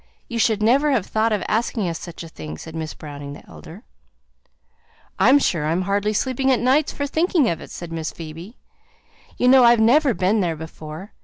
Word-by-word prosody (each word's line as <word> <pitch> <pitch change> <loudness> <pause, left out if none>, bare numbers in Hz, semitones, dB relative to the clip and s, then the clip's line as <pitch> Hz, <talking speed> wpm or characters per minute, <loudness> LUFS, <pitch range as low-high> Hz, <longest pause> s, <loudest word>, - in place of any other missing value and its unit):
You 235 -2 -4
should 220 -2 +2
never 270 +7 +3
have 225 -8 0
thought 220 +1 0
of 210 -3 0
asking 220 -2 -1
us 165 -1 -3
such 170 -1 -9
a - - -9
thing," 80 - -8
said 160 - -10
Miss 160 -1 -5
Browning 145 -1 -8
the - - -13
elder. 185 +8 -12 1.4
"I'm 270 - +6
sure 165 - 0
I'm 170 +4 0
hardly 200 +2 0
sleeping 260 +4 0
at 255 - +2
nights 270 +4 +2
for 285 - -3
thinking 320 -1 +1
of 170 - -2
it," - - -10
said 175 -1 -8
Miss 160 -1 -3
Phoebe. 165 +7 -10 0.8
"You 250 - +2
know 260 0 +7
I've 235 -1 +6
never 255 +3 +4
been 195 +4 +1
there 170 -3 -1
before. 160 +4 -9
205 Hz, 200 wpm, -22 LUFS, 165-250 Hz, 1.4 s, know